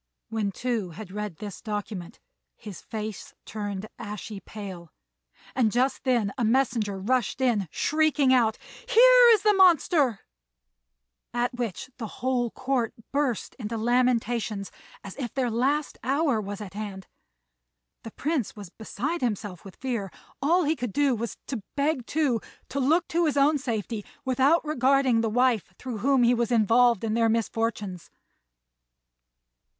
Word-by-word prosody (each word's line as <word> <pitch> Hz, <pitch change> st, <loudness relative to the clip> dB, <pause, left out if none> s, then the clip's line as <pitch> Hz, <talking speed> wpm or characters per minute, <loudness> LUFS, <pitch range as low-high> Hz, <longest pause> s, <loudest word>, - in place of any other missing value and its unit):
When 215 Hz, -3 st, -1 dB
Tou 230 Hz, -3 st, -2 dB
had 185 Hz, +3 st, -9 dB
read 210 Hz, -3 st, -4 dB
this 200 Hz, -5 st, -7 dB
document 205 Hz, -4 st, -5 dB, 0.4 s
his 210 Hz, -4 st, -9 dB
face 215 Hz, -2 st, -6 dB
turned 205 Hz, -2 st, -5 dB
ashy 210 Hz, 0 st, -6 dB
pale; 190 Hz, -4 st, -9 dB, 0.6 s
and 235 Hz, -5 st, +2 dB
just 255 Hz, +4 st, 0 dB
then 235 Hz, -6 st, +1 dB
a -, -, +1 dB
messenger 230 Hz, -4 st, +1 dB
rushed 245 Hz, +4 st, 0 dB
in, 235 Hz, -8 st, +1 dB
shrieking 300 Hz, -, +2 dB
out, 225 Hz, -4 st, +3 dB, 0.3 s
"Here -, -, +8 dB
is 425 Hz, -, +2 dB
the 420 Hz, -1 st, +5 dB
monster!" 335 Hz, -, +4 dB, 1.1 s
at 240 Hz, +1 st, 0 dB
which 245 Hz, 0 st, -4 dB
the 225 Hz, -, -4 dB
whole 245 Hz, +1 st, -1 dB
Court 260 Hz, -2 st, -1 dB, 0.2 s
burst 275 Hz, -6 st, -1 dB
into 225 Hz, 0 st, -4 dB
lamentations 235 Hz, -3 st, 0 dB, 0.3 s
as 195 Hz, -, -8 dB
if 245 Hz, -5 st, -5 dB
their 255 Hz, -3 st, 0 dB
last 275 Hz, +6 st, 0 dB
hour 275 Hz, -2 st, +1 dB
was 205 Hz, 0 st, -6 dB
at 200 Hz, -3 st, -8 dB
hand. 200 Hz, -3 st, -6 dB, 1.0 s
The 225 Hz, -, -8 dB
Prince 285 Hz, 0 st, -2 dB
was 200 Hz, -5 st, -10 dB
beside 260 Hz, -, -4 dB
himself 205 Hz, -6 st, -3 dB
with 195 Hz, -2 st, -11 dB
fear; 235 Hz, -8 st, -3 dB, 0.3 s
all 340 Hz, +6 st, +3 dB
he 310 Hz, +1 st, +1 dB
could 245 Hz, -6 st, -4 dB
do 285 Hz, -2 st, +3 dB
was 235 Hz, 0 st, -4 dB
to 255 Hz, -6 st, -4 dB
beg 280 Hz, -3 st, 0 dB
Tou 285 Hz, -7 st, +1 dB, 0.3 s
to 280 Hz, -, -2 dB
look 320 Hz, +6 st, +2 dB
to 340 Hz, 0 st, +2 dB
his 290 Hz, -, 0 dB
own 290 Hz, +2 st, +4 dB
safety 225 Hz, -4 st, -3 dB, 0.2 s
without 270 Hz, +6 st, +3 dB
regarding 265 Hz, -4 st, +3 dB
the 225 Hz, -, 0 dB
wife 235 Hz, -5 st, +1 dB
through 245 Hz, -4 st, -6 dB
whom 265 Hz, +2 st, +3 dB
he 240 Hz, +1 st, +5 dB
was 235 Hz, 0 st, 0 dB
involved 235 Hz, 0 st, +4 dB
in 220 Hz, -1 st, -1 dB
their 230 Hz, 0 st, +3 dB
misfortunes. 225 Hz, -4 st, -2 dB
235 Hz, 145 wpm, -26 LUFS, 210-270 Hz, 1.1 s, Here